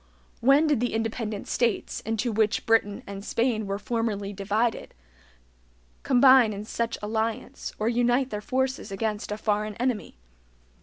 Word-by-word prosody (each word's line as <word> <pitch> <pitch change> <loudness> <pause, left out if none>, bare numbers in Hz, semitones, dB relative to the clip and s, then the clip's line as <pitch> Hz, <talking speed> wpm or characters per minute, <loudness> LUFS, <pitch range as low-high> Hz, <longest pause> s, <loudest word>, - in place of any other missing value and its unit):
When 275 +5 +5
did 295 -6 +2
the 245 -1 -1
independent 225 -2 -3
states, 235 -4 0
into 225 +2 -2
which 215 0 +1
Britain 225 -3 +2
and 200 0 -7
Spain 230 -2 0
were 195 0 -2
formerly 210 -2 -2
divided, 210 +4 -1 1.1
combine 255 -3 +6
in 205 +1 -6
such 230 +1 -2
alliance, 220 +1 -3
or 215 - -1
unite 245 +2 +2
their 210 -1 -3
forces 260 -1 -2
against 210 +1 -3
a 210 - -2
foreign 210 -1 -1
enemy? 245 -2 -2
225 Hz, 140 wpm, -26 LUFS, 210-245 Hz, 1.1 s, combine